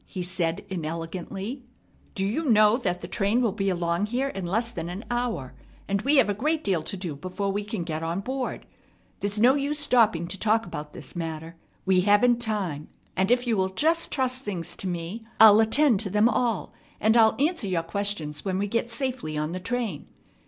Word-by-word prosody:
he 185 -3 -5
said 175 0 -1
inelegantly. 185 - -5 0.5
"Do 195 - -1
you 275 +9 -1
know 215 -1 +6
that 180 -8 -2
the - - -6
train 205 +4 +1
will 235 -4 +2
be 195 -1 -1
along 175 +2 0
here 255 +5 -1
in 195 -7 -5
less 225 +6 0
than 170 -6 -5
an 185 +5 -6
hour, 240 - -2 0.3
and 200 0 0
we 280 +6 +2
have 265 -6 +5
a 205 - +1
great 305 +9 -1
deal 185 -5 +1
to 195 - -5
do 175 -5 -4
before 185 +6 -3
we 205 +1 -2
can 205 -3 -4
get 160 -1 -4
on 165 +3 -2
board? 260 +3 -4 0.5
There's 205 +1 -1
no 245 +4 +6
use 285 +1 -1
stopping 230 - +3
to 190 - -5
talk 225 +1 +2
about 150 0 -7
this 140 - -9
matter. 165 -1 -5 0.3
We 190 -1 +4
haven't 210 +5 +4
time. 195 -10 -2 0.3
If 245 +7 +2
you 235 -2 +1
will 190 -1 +1
just 320 - +1
trust 260 -1 0
things 185 -5 -4
to 190 - -4
me, 175 +5 -4 0.2
I'll 220 -1 +9
attend 225 +1 +4
to 205 -1 -1
them 210 +3 +4
all, 230 -3 0 0.3
and 220 +2 +3
I'll 220 -2 +5
answer 300 - 0
your 175 -3 0
questions 170 -4 -3
when 190 -2 -1
we 200 - 0
get 230 +3 -1
safely 240 - -3
on 150 +1 -2
the 185 - -4
train. 220 - -3
205 Hz, 200 wpm, -26 LUFS, 175-235 Hz, 0.5 s, I'll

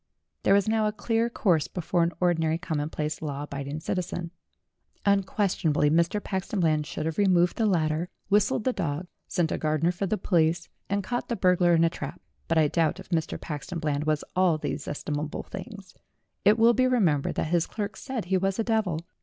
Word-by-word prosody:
There 195 - +4
was 200 0 +2
now 220 -1 +2
a - - 0
clear 225 +2 0
course 175 -9 +1
before 175 0 -1
an 170 0 +2
ordinary 165 -3 +2
commonplace, 155 -2 -3
law 145 -2 -4
abiding 140 +1 -5
citizen. 175 -1 -3 0.7
Unquestionably 190 -6 +2
Mr. 170 +5 +2
Paxton 190 +1 -3
Bland 155 -3 +2
should 155 - -4
have 160 +2 -2
removed 180 -3 +4
the 225 - +2
ladder, 165 -2 +1 0.2
whistled 205 +2 +2
the 255 - +1
dog, 165 -3 -2 0.2
sent 170 -3 0
a - - -1
gardener 155 +2 +1
for 185 +2 -3
the 215 - 0
police, 170 -3 +1 0.2
and 200 0 0
caught 245 +5 -3
the 235 - 0
burglar 180 -3 +4
in 165 - +4
a 165 - +4
trap. 140 -4 -6 0.3
But 165 - +1
I 155 -1 +5
doubt 165 +3 +1
if 190 - -11
Mr. 160 -3 -1
Paxton 155 +3 -5
Bland 150 -2 -1
was 155 -1 +1
all 180 -3 +3
these 150 -2 -4
estimable 150 +1 -3
things. 195 -1 -9 0.5
It 210 +2 +5
will 230 +1 +6
be 255 +1 +3
remembered 180 - +2
that - - -1
his 170 -1 +2
clerks 205 -1 -5
said 260 -7 -4
he 190 +1 +1
was 195 +1 0
a 225 - +1
devil. 215 -8 0
175 Hz, 195 wpm, -27 LUFS, 155-200 Hz, 0.7 s, will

